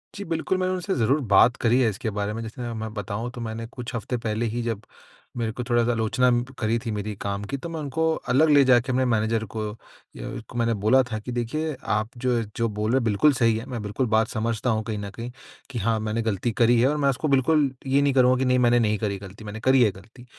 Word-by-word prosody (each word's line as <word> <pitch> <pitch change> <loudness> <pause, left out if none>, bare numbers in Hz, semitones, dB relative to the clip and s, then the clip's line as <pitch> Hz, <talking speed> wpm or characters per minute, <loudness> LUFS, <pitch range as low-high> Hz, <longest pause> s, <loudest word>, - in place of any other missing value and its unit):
जी, 200 - -5
बिल्कुल 165 +2 -1
मैंने 185 0 0
उनसे 185 +1 -2
ज़रूर 130 +5 +2 0.2
बात 120 +5 +6
करी 120 +2 +4
है 120 - +3
इसके 110 +3 -4
बारे 105 +1 -1
में 115 - -4
जैसे 120 +2 -6
मैं 110 -1 -5
बताऊँ 105 +3 -4
तो 120 - -6
मैंने 115 0 -5
कुछ 120 0 -7
हफ़्ते 120 +2 -3
पहले 115 0 -2
ही 120 - -1
जब 115 -3 -3 0.6
मेरे 115 -2 -1
को 125 +3 -5
थोड़ा-सा 120 0 +2
आलोचना 120 +3 +2 0.3
करी 110 +1 +1
थी 115 -1 -4
मेरी 105 0 -4
काम 100 0 -3
की 140 - -4
तो 170 +5 -7
मैं 165 -1 -5
उनको 150 +2 -2 0.3
अलग 145 +6 +4
ले 145 -2 +6
जाके 125 -1 +4
मैं 130 - +2
मैनेजर 110 -1 +1
को 110 -1 -2 0.5
य - - -7
उसको 115 +2 -7
मैंने 115 -1 +2
बोला 130 +5 +5
था 110 - -1
कि 115 +4 -7
देखिए 140 +6 -2 0.2
आप 110 +1 -1
जो 120 -1 +1 0.2
जो 115 - +1
बोल 105 +1 -2
रहे 130 - +3
हो - - -3
बिल्कुल 115 +8 +4
सही 115 -3 +2
है। 115 - -6
मैं 120 -3 -4
बिल्कुल 105 +6 -1
बात 110 0 +4
समझता 115 +1 -2
हूँ 110 -1 0
कहीं 110 -1 -4
न 100 0 -5
कहीं 120 +1 -6 0.4
कि 125 -4 -4
हाँ, 110 +2 +1
मैंने 110 +1 -2
ग़लती 110 +1 -1
करी 120 +2 +3
है 125 - +4
और 150 - 0
मैं 140 -2 +2
उसको 135 +3 -1
बिल्कुल 140 +1 +3 0.2
ये 135 +1 +3
नहीं 140 -1 +2
करूँगा 130 -1 +4
कि 130 - +1
नहीं 125 0 +3
मैंने 120 0 +4
नहीं 105 -2 +1
करी 100 -2 -2
ग़लती, 100 +2 -11
मैंने 105 +1 -7
करी 130 +2 +4
है 105 - +3
ग़लती, 110 +7 -15
115 Hz, 255 wpm, -25 LUFS, 110-130 Hz, 0.6 s, बात